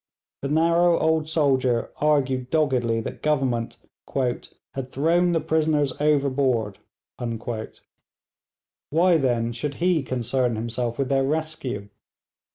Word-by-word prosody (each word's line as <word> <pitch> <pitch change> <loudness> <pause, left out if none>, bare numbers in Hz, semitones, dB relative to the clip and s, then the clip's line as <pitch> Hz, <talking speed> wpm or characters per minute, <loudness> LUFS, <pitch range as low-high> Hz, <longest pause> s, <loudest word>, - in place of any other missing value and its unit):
The 140 - -3
narrow 170 +3 +3
old 160 -1 +1
soldier 130 -6 +1
argued 135 -4 +1
doggedly 125 -7 +1
that - - -7
Government 135 -6 0 0.9
'had 130 -1 -6
thrown 170 +5 +2
the 165 - +2
prisoners 155 -4 +1
overboard.' 135 -8 +1 2.1
Why, 170 +3 +4
then, 120 -4 0
should 140 +4 -4
he 175 -2 +2
concern 125 -1 -1
himself 120 +1 -3
with 135 -2 -1
their 135 -1 +2
rescue? 140 -8 -3
135 Hz, 105 wpm, -24 LUFS, 125-155 Hz, 2.1 s, Why